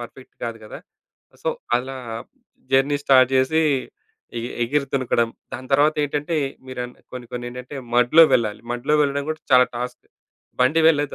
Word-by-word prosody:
Perfect 120 +2 -11
కాదు 115 -1 -5
కదా. 105 - -9 0.6
So, - - -1 0.3
అలా 130 +2 -5 0.8
జర్నీ 140 +2 +3 0.4
జేసి 130 +5 +3 0.8
ఎ - - -3 0.2
ఎగిరి 140 +4 0
తునకడం. 120 -3 +1 0.2
దాని 130 0 -7
తరువాతేంటంటే 150 +2 +1 0.3
మీరన్ 125 -1 -6 0.2
కొన్ని, 125 -1 -7
కొన్ని 120 0 -5
ఏంటంటే 125 +3 -8 0.2
మడ్‌లో 125 +7 +6
వెళ్ళాలి. 110 -4 0
మడ్‌లో 120 +5 0
వెళ్ళడం 140 0 -1
కూడా 155 0 -4
చాలా 125 0 +7
టాస్క్. 125 +1 -5 0.6
బండి 145 +6 +4
వెళ్ళలేదు. 145 -3 +1
130 Hz, 135 wpm, -22 LUFS, 125-145 Hz, 0.8 s, చాలా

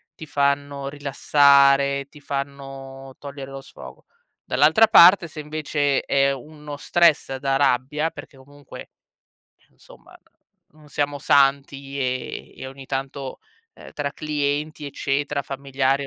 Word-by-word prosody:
ti 160 - -10
fanno 140 -1 -1
rilassare, 140 -1 +3
ti 150 - -16
fanno 135 -1 -7
togliere 140 -1 -9
lo 135 0 -8
sfogo. - - -13 0.4
Dall'altra 225 0 +4
parte, 175 -1 +7
se 155 -1 -8
invece 150 -2 -1
è 140 0 +2
uno 150 +2 -9
stress 165 -3 +2
da 135 +1 -1
rabbia, 140 +3 +1
perché 140 - -12
comunque, 145 +1 -13 0.9
somma - - -18 0.6
non 155 -1 -19
siamo 145 0 -2
santi, 140 0 +1
ehm, 130 -1 -4
e - - -5
ogni 135 0 -12
tanto, 135 0 -5 0.3
ehm, - - -13
tra 140 -1 -3
clienti 150 0 -3
eccetera, 140 +1 -2
familiari, 135 0 -1
140 Hz, 120 wpm, -22 LUFS, 135-145 Hz, 0.9 s, parte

